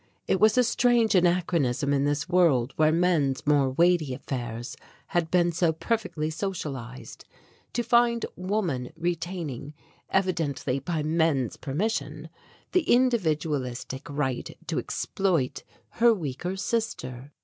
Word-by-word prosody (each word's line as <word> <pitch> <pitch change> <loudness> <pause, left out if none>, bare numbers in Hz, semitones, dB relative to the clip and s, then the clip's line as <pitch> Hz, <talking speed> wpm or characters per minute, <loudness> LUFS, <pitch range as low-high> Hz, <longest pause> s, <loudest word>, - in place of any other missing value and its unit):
It 190 - +2
was 215 +2 +4
a 250 - +6
strange 240 -1 +3
anachronism 170 -7 +2
in 140 0 +2
this 145 0 0
world 155 -9 +3
where 155 0 +4
men's 160 -6 +1
more 145 -2 +3
weighty 165 -1 +2
affairs 120 -3 -5 0.3
had 170 -2 0
been 175 -1 +3
so 170 0 +2
perfectly 160 -3 -2
socialized, 140 -9 -5 0.5
to 240 - 0
find 235 0 +3
woman 180 - -2
retaining, 165 -4 -4 0.3
evidently 160 -8 0
by 155 +2 -2
men's 155 -5 +1
permission, 155 -1 -3 0.4
the 365 - +3
individualistic 155 - 0
right 135 -3 -3
to - - -1
exploit 170 -10 -1 0.3
her 235 -1 +4
weaker 175 +2 -4
sister. 145 - -3
160 Hz, 115 wpm, -26 LUFS, 140-185 Hz, 0.5 s, a